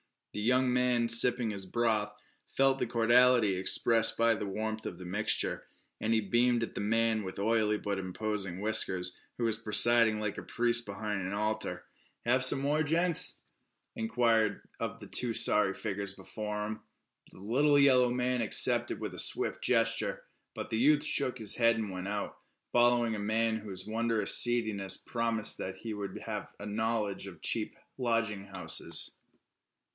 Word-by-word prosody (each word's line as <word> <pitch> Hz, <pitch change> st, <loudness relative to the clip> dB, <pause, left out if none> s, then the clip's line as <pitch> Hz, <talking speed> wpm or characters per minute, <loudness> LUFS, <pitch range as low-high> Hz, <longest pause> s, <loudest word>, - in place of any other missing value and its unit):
The -, -, -5 dB
young 125 Hz, +4 st, +1 dB
man, 125 Hz, -2 st, +1 dB
sipping 115 Hz, 0 st, +4 dB
his 100 Hz, -2 st, -3 dB
broth, 110 Hz, -2 st, -1 dB, 0.3 s
felt 135 Hz, 0 st, +1 dB
the -, -, -1 dB
cordiality 120 Hz, -1 st, +3 dB
expressed 110 Hz, +4 st, +3 dB
by 115 Hz, 0 st, +3 dB
the 105 Hz, -2 st, -5 dB
warmth 110 Hz, +2 st, -5 dB
of 85 Hz, -, -6 dB
the 90 Hz, -, -10 dB
mixture, 105 Hz, +5 st, -2 dB, 0.3 s
and 110 Hz, -, -2 dB
he 110 Hz, -, +2 dB
beamed 120 Hz, +3 st, +1 dB
at -, -, -6 dB
the -, -, -5 dB
man 115 Hz, +1 st, 0 dB
with 95 Hz, -1 st, -8 dB
oily 105 Hz, 0 st, +1 dB
but 100 Hz, -2 st, -4 dB
imposing 95 Hz, -1 st, -5 dB
whiskers, 95 Hz, -4 st, +1 dB, 0.2 s
who 120 Hz, -, -4 dB
was 115 Hz, -2 st, 0 dB
presiding 115 Hz, 0 st, +4 dB
like 105 Hz, -2 st, -4 dB
a -, -, -9 dB
priest 120 Hz, 0 st, +1 dB
behind 100 Hz, 0 st, -4 dB
an 95 Hz, +1 st, -5 dB
altar. 105 Hz, +1 st, -3 dB, 0.4 s
"Have 125 Hz, +2 st, +2 dB
some 130 Hz, +1 st, +4 dB
more, 145 Hz, +3 st, 0 dB
gents?" 165 Hz, +2 st, +4 dB, 0.5 s
he -, -, -8 dB
inquired 110 Hz, -2 st, 0 dB
of -, -, -4 dB
the -, -, -9 dB
two 120 Hz, -2 st, 0 dB
sorry 100 Hz, -2 st, +3 dB
figures 100 Hz, 0 st, -5 dB
before 105 Hz, 0 st, -6 dB
him. 110 Hz, +1 st, -5 dB, 0.5 s
The -, -, -16 dB
little 145 Hz, +8 st, +2 dB
yellow 130 Hz, -3 st, +4 dB
man 125 Hz, 0 st, -1 dB
accepted 110 Hz, -, +2 dB
with -, -, -5 dB
a -, -, -5 dB
swift -, -, +2 dB
gesture, 115 Hz, -2 st, 0 dB, 0.3 s
but -, -, -6 dB
the 110 Hz, -, -1 dB
youth 145 Hz, +3 st, +3 dB
shook 135 Hz, -4 st, 0 dB
his 110 Hz, -4 st, +3 dB
head 115 Hz, -1 st, +3 dB
and 110 Hz, -3 st, -4 dB
went 90 Hz, 0 st, -6 dB
out, 105 Hz, 0 st, -5 dB, 0.3 s
following 120 Hz, -1 st, +2 dB
a -, -, -5 dB
man 110 Hz, +2 st, 0 dB
whose 95 Hz, -4 st, -5 dB
wondrous 115 Hz, 0 st, 0 dB
seediness 110 Hz, -6 st, +1 dB
promised 115 Hz, -2 st, 0 dB
that 95 Hz, -, -5 dB
he 110 Hz, +2 st, -7 dB
would 100 Hz, -2 st, -6 dB
have -, -, -6 dB
a 100 Hz, -, -9 dB
knowledge 105 Hz, -2 st, -3 dB
of 90 Hz, -5 st, -12 dB
cheap -, -, -1 dB, 0.2 s
lodging 115 Hz, -5 st, -1 dB
houses. 90 Hz, -4 st, -1 dB
110 Hz, 170 wpm, -30 LUFS, 105-120 Hz, 0.5 s, sipping